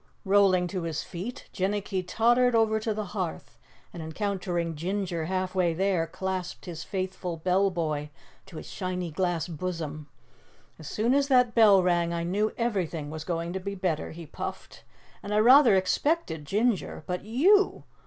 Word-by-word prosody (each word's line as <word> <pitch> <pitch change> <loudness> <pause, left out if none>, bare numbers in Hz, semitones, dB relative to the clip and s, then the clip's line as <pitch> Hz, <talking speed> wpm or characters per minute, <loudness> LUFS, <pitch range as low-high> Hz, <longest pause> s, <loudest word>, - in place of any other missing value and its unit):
Rolling 195 -2 +4
to 185 -1 -3
his 165 -2 -3
feet, 195 +8 -7
Jinnicky 195 0 -1
tottered 240 +6 +3
over 220 -1 +3
to 220 +1 -2
the 215 0 -2
hearth 80 - -5 0.3
and, 170 - -7
encountering 175 -1 -2
Ginger 175 0 -2
half 185 +1 -2
way 175 -3 +1
there, 185 -2 +1
clasped 185 +1 -4
his 165 -2 -6
faithful 185 -2 -4
Bell 185 +4 +2
Boy 155 -4 -2 0.4
to 165 - -10
his - - -7
shiny 180 -3 -4
glass 175 -1 -1
bosom. 155 -3 -5 0.7
"As 155 - -9
soon 230 +4 +1
as 280 0 +3
that 250 -3 +4
bell 205 -5 +6
rang 175 -1 +1
I 170 0 -2
knew 205 +5 0
everything 180 -10 -2
was 160 0 -6
going 170 0 -3
to 190 - -2
be 200 +2 -5
better," 180 -5 -2
he 165 +1 -9
puffed. - - -7 0.4
"And 205 +1 -3
I - - +3
rather 245 0 +7
expected 190 - 0
Ginger, 210 -2 0
but 180 +2 -3
YOU! 350 - +3
185 Hz, 165 wpm, -27 LUFS, 170-210 Hz, 0.7 s, rather